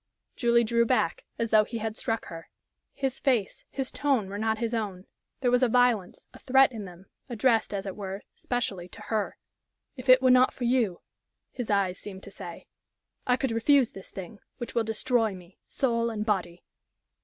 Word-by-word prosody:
Julie 235 -1 +3
drew 235 +1 +2
back - - 0
as 230 -1 -2
though 215 -1 +6
he 230 +2 -5
had 220 -1 -3
struck 225 0 -2
her. 165 -1 -9 0.5
His 270 -2 -2
face, 240 -8 0
his 270 -2 -3
tone 265 -9 0
were 200 +1 -5
not 220 0 0
his 230 +1 -2
own 200 -5 -3 0.4
there 250 -2 +2
was 250 +1 +3
a 255 - +5
violence, 240 -6 +2
a - - -13
threat 265 0 +5
in 220 -4 -6
them, 180 0 -12 0.2
addressed, 230 -1 +2
as 200 -1 -3
it 195 - -5
were, 195 -1 -6
specially 205 -8 -3
to - - -12
her. 215 -2 -1 0.6
"If 255 -1 -8
it 255 0 +9
were 260 -1 +4
not 255 0 +5
for 250 - -6
you," 235 -7 +1 0.5
his 245 -4 -5
eyes 195 -3 +1
seemed 190 -2 -9
to 200 - -10
say, 170 -3 -9 0.6
"I 250 0 +4
could 265 -2 -1
refuse 245 +3 +3
this 195 - -10
thing, 190 +2 -9 0.2
which 240 - -6
will 235 - +2
destroy 220 -1 +1
me, 180 0 -15
soul 235 -3 0
and 215 -2 -3
body." 180 -5 -1
225 Hz, 190 wpm, -28 LUFS, 200-250 Hz, 0.6 s, it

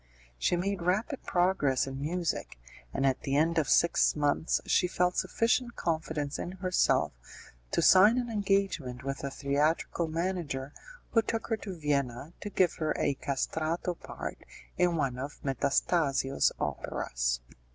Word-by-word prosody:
She 175 - +2
made 190 +1 -1
rapid 210 - 0
progress 175 -8 +2
in 135 0 -6
music, 165 - -2 0.3
and 135 - -1
at 135 -1 +1
the 135 -1 -1
end 165 +3 +3
of 150 - -1
six 170 - +4
months 145 +2 +1
she 180 - +3
felt 180 0 +1
sufficient 235 +1 +1
confidence 155 -3 -2
in 180 - -4
herself 185 -1 +2 0.6
to - - +1
sign 210 +6 +7
an 245 -1 0
engagement 195 - 0
with 135 +1 -4
a 140 - -1
theatrical 145 +4 0
manager 160 -5 -3 0.4
who 225 - +4
took 225 0 -3
her 225 - +1
to 195 -4 -7
Vienna 140 -1 -1
to 205 - -4
give 185 -3 +2
her 155 -1 -1
a 140 - +1
'castrato' 155 +5 -2
part - - -7 0.4
in 175 -1 +2
one 135 -5 -1
of 140 +2 -6
Metastasio's 135 +1 +1
operas. - - -2
160 Hz, 145 wpm, -30 LUFS, 140-185 Hz, 0.6 s, sign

